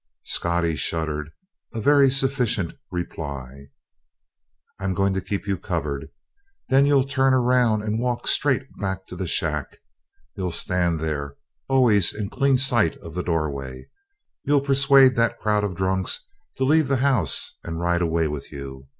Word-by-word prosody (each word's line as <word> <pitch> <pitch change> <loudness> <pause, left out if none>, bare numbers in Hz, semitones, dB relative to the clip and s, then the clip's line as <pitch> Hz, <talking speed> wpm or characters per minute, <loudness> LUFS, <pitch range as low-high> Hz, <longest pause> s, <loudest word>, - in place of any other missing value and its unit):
Scottie 85 -1 0
shuddered 80 -2 -2 0.5
a - - -2
very 140 +3 +5
sufficient 130 - 0 0.2
reply. 70 -6 -6 1.1
"I'm 95 -1 -2
going 100 0 +1
to 95 - -1
keep 100 +2 -4
you 100 -3 -2
covered. 80 -5 -3 0.6
Then 135 +1 +4
you'll 140 -2 +4
turn 135 -1 +2
around 125 -4 +2
and 110 +1 -1
walk 125 0 -2
straight 135 -2 +2 0.2
back 95 -1 -3
to - - -8
the 95 0 -4
shack. 75 -3 -1 0.6
You'll 95 -2 -2
stand 85 -1 0
there 70 -3 -3 0.3
always 120 -8 +3
in 105 0 -4
clean 140 -1 +2
sight 125 - +2
of - - -11
the 90 - -2
doorway 75 -6 -2
and - - -13 0.6
you'll 145 -1 +2
persuade 135 -1 +5
that 115 0 +2
crowd 105 -1 0
of 100 -3 -2
drunks 95 0 -1 0.3
to - - 0
leave 155 +2 +3
the 135 0 +1
house 115 - +1
and 80 0 -5
ride 85 0 +1
away 80 -1 +1
with 75 -2 -6
you. 65 -1 -9
95 Hz, 155 wpm, -23 LUFS, 80-130 Hz, 1.1 s, very